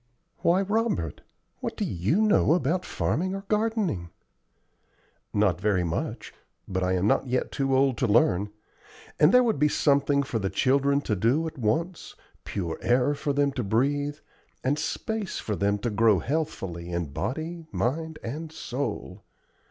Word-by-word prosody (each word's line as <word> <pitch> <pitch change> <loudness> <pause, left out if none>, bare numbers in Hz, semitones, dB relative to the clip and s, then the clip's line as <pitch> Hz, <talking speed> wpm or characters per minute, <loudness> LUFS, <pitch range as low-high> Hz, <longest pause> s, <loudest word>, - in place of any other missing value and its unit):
"Why, 180 +3 +3
Robert! 205 - -1 0.4
what - - -4
do - - 0
you 105 - +1
know 210 -6 +4
about 175 +3 0
farming 185 +4 -1
or 195 - -4
gardening?" 210 - 0 1.2
"Not 100 -4 +1
very 100 -3 +2
much, 85 -1 -3 0.3
but 95 0 -2
I 90 0 +1
am 90 +1 +1
not 120 +5 +2
yet 125 +1 -1
too 135 -2 +1
old 135 -2 +2
to 125 - +2
learn; 105 -2 +3 0.7
and 150 +3 +6
there 250 +2 +6
would 225 - +1
be 150 - +5
something 140 -1 +2
for 130 -4 -2
the 95 -2 -1
children 140 +7 +2
to 110 - -1
do 120 - +2
at 160 -3 -6
once, 160 +11 -1 0.3
pure 85 -5 -3
air 125 +4 +3
for 145 0 -2
them 140 0 +2
to 130 -2 -3
breathe, 145 +7 0 0.5
and 145 +3 +1
space 210 +6 -3
for 105 - -3
them 100 +1 +1
to 115 +3 -2
grow 110 -1 +4
healthfully 95 - -3
in 85 -5 -3
body, 160 - -4
mind, 160 +5 -2
and 155 +7 -5
soul. 125 - -5
135 Hz, 160 wpm, -26 LUFS, 105-160 Hz, 1.2 s, and